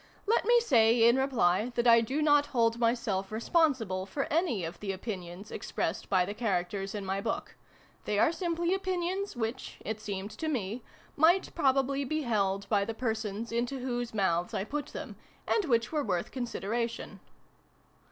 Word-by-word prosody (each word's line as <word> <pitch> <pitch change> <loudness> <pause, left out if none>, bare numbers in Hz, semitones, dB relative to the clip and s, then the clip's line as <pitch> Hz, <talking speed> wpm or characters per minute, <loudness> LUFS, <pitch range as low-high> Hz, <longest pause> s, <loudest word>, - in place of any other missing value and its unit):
Let 435 +1 +2
me 480 +2 +6
say, 230 - +5
in 235 +2 +5
reply, 245 -5 +2
that 240 - +1
I 230 -1 +7
do 270 +7 -1
not 290 -1 +4
hold 230 -2 +1
myself 230 -5 0
responsible 225 - +1
for 275 +8 -2
any 315 - +1
of 165 - -7
the 200 -2 -3
opinions 190 -1 -6
expressed - - -3
by 185 -2 +3
the 200 - -4
characters 195 -2 -2
in 205 -2 -4
my 190 +1 -1
book. 225 - -3 0.5
They 210 - 0
are 260 - +4
simply 340 0 -1
opinions 375 0 -2
which, 230 0 -4
it 220 0 -3
seemed 200 -1 -4
to 265 +9 -5
me, 235 -5 -2 0.3
might 340 +5 +4
probably 275 -2 +2
be 310 +3 -2
held 200 -4 0
by 200 -1 +2
the 225 +2 -4
persons 220 -2 -3
into 240 +3 -1
whose 245 -2 -3
mouths 180 -4 0
I - - 0
put 290 +7 -4
them, - - -8 0.3
and 425 - +2
which 235 -5 +1
were 305 -2 0
worth 180 -7 -2
consideration. 235 -2 -3
230 Hz, 170 wpm, -30 LUFS, 200-280 Hz, 0.5 s, I